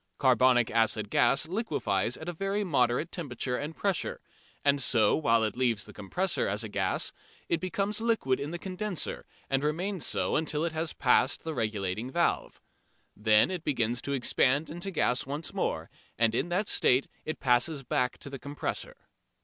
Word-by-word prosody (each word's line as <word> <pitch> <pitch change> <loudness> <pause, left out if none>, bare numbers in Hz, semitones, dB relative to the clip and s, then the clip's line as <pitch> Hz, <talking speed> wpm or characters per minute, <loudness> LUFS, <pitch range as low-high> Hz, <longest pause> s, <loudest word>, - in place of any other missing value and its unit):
Carbonic 130 -2 +4
acid 110 -2 +1
gas 140 +3 +3
liquefies 125 - -1
at 160 - -9
a 175 - -2
very 195 +4 -1
moderate 135 -2 +1
temperature 130 -6 -3
and 150 +5 -4
pressure, 195 -3 -1 0.5
and 140 -1 +4
so 120 -3 +4
while 115 -7 +3
it 110 -2 -1
leaves 120 -4 +1
the - - -12
compressor 180 - -1
as 105 +3 -2
a 110 - -5
gas 95 -2 0 0.4
it 170 - +1
becomes 200 +3 -2
liquid 225 - +1
in 140 - -4
the 175 - -4
condenser 190 +1 -4 0.2
and 135 0 +1
remains 175 +4 -1
so - - 0
until 155 0 0
it 170 - -1
has 160 0 -2
passed 130 +1 +2
the 160 - -3
regulating 110 -2 -2
valve. 170 +6 0 0.6
Then 105 - +4
it 180 -3 -4
begins 120 -5 0
to 140 - -3
expand 140 +3 +2
into 175 +4 -4
gas 130 -8 +1
once 145 +2 -4
more, - - -2 0.3
and 115 -1 +3
in 165 - 0
that 195 +4 0
state 130 +2 +3 0.2
it 155 - -4
passes 135 +3 +2
back 125 0 0
to 140 - -8
the 135 - -6
compressor. 145 +2 -4
140 Hz, 175 wpm, -29 LUFS, 120-170 Hz, 0.6 s, Carbonic